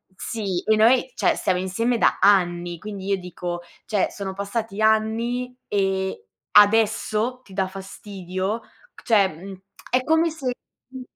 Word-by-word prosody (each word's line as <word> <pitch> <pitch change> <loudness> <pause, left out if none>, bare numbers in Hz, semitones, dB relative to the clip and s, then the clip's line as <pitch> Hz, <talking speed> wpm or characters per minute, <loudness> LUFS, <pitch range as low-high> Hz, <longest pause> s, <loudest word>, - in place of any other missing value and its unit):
sì, 195 -4 -3
e 220 - +3
noi, 235 - +4
cioè - - +2
stiamo 185 -2 0
insieme 230 +6 0
da - - +2
anni. 175 -3 +3
Quindi 200 0 -7
io 200 - +2
dico: 175 -1 -5 0.3
"Cioè, 205 -3 +1
sono 195 -2 -5
passati 205 +1 -4
anni 230 +3 +1
e 190 - -1 0.3
adesso, 220 +3 +3
ti 195 - -16
dà 190 -1 0
fastidio." 190 +1 -5 0.4
Cioè, 205 -4 +4
mhmm, 185 +3 -10 0.3
è 255 0 +2
come 320 +2 +3
se 270 -6 -3 0.4
mh 260 0 -8
205 Hz, 140 wpm, -23 LUFS, 190-230 Hz, 0.4 s, noi